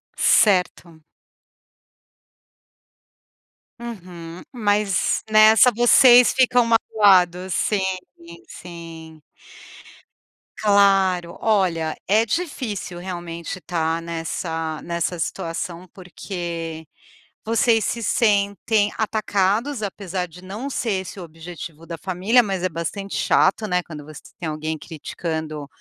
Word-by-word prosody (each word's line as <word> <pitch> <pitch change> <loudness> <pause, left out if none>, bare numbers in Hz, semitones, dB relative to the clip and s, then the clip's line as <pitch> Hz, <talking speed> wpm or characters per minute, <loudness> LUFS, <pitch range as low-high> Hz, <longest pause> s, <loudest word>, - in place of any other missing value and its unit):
Certo. 180 -5 +2 2.8
Uhum, 180 -7 -9
mas 205 -4 +1
nessa 215 +3 +7
vocês 240 +1 +7
ficam 250 -2 +3
magoados, 190 -5 +3
sim, 205 -3 0 0.4
sim, 170 0 -13
sim. 165 -2 -11 1.4
Claro. 195 -4 +3
Olha, 180 -7 +1
é 215 +3 +3
difícil 230 - -4
realmente 175 0 -6
estar 165 0 -2
nessa 165 -1 -4
nessa 170 +1 -3
situação, 170 +2 -4
porque 170 -3 -6 0.6
vocês 225 0 +2
se 235 +3 -2
sentem 205 -1 +1
atacados 215 +3 0
apesar 190 -2 -4
de 175 +1 -14
não 205 +9 -6
ser 220 -8 -1
esse 190 +1 -9
o 180 - -7
objetivo 165 -1 -10
da 165 0 -7
família, 190 +8 +2
mas 195 -5 -3
é 185 - +1
bastante 170 +4 -5
chato, 215 - +2
né, 180 -2 +1
quando 150 -4 -10
você 150 -2 -11 0.2
tem 170 - -4
alguém 155 +1 -3
criticando 160 -1 -6
185 Hz, 100 wpm, -22 LUFS, 165-210 Hz, 2.8 s, nessa